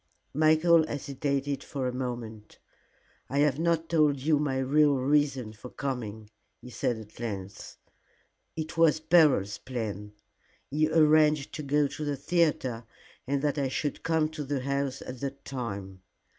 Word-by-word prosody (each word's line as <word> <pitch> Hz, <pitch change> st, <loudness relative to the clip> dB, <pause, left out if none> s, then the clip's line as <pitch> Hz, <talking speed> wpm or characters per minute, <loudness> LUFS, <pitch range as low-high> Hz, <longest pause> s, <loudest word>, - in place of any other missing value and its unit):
Michael 160 Hz, +2 st, +4 dB
hesitated 140 Hz, 0 st, -2 dB
for 135 Hz, -3 st, -3 dB
a 125 Hz, -, -3 dB
moment. 120 Hz, -4 st, -6 dB, 0.7 s
"I 140 Hz, -, -2 dB
have 145 Hz, -1 st, +3 dB
not 165 Hz, -1 st, +1 dB
told 150 Hz, -4 st, +3 dB
you 150 Hz, +2 st, +2 dB
my 140 Hz, -3 st, 0 dB
real 145 Hz, +2 st, +3 dB
reason 135 Hz, -4 st, +1 dB
for 110 Hz, +4 st, -11 dB
coming," 110 Hz, -7 st, -5 dB, 0.3 s
he 125 Hz, -, -12 dB
said 120 Hz, -1 st, -1 dB
at 110 Hz, 0 st, -12 dB
length. 100 Hz, -4 st, -6 dB, 0.8 s
"It 160 Hz, +1 st, -5 dB
was 160 Hz, -2 st, +5 dB
Beryl's 155 Hz, -, +3 dB
plan. 105 Hz, -5 st, -5 dB, 0.6 s
He 155 Hz, +2 st, +2 dB
arranged 155 Hz, -2 st, +4 dB
to -, -, -4 dB
go 145 Hz, +1 st, +2 dB
to 145 Hz, +2 st, -5 dB
the 145 Hz, -2 st, -2 dB
theatre, 140 Hz, -6 st, 0 dB, 0.4 s
and 140 Hz, +1 st, -1 dB
that 145 Hz, 0 st, 0 dB
I 140 Hz, -, +1 dB
should 140 Hz, +2 st, -3 dB
come 160 Hz, -1 st, +1 dB
to 155 Hz, -1 st, -6 dB
the 140 Hz, -1 st, -2 dB
house 140 Hz, 0 st, -2 dB
at 125 Hz, -1 st, -8 dB
that 140 Hz, +1 st, -6 dB
time. 100 Hz, -8 st, -6 dB
140 Hz, 150 wpm, -28 LUFS, 125-150 Hz, 0.8 s, was